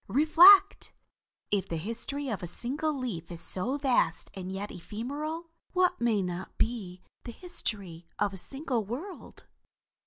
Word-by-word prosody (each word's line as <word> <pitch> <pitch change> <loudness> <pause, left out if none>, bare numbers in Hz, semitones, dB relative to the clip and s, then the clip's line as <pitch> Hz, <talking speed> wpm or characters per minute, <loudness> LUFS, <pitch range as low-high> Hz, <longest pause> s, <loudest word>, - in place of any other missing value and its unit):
Reflect! 355 +8 +6 0.6
If 200 -3 0
the 165 - -2
history 230 - -4
of 220 -6 -3
a 175 - -4
single 270 - -2
leaf 235 - -4
is 170 - -7
so 210 +10 -2
vast 260 - +1
and 185 -1 -6
yet 200 +2 -5
ephemeral, 290 - -5 0.2
what 365 -7 +2
may 220 -4 +2
not 180 +1 -5
be 195 -6 -2 0.2
the 235 - -7
history 200 - -5
of 205 -1 0
a - - -7
single 265 - 0
world? 280 - -8
235 Hz, 145 wpm, -29 LUFS, 190-295 Hz, 0.6 s, Reflect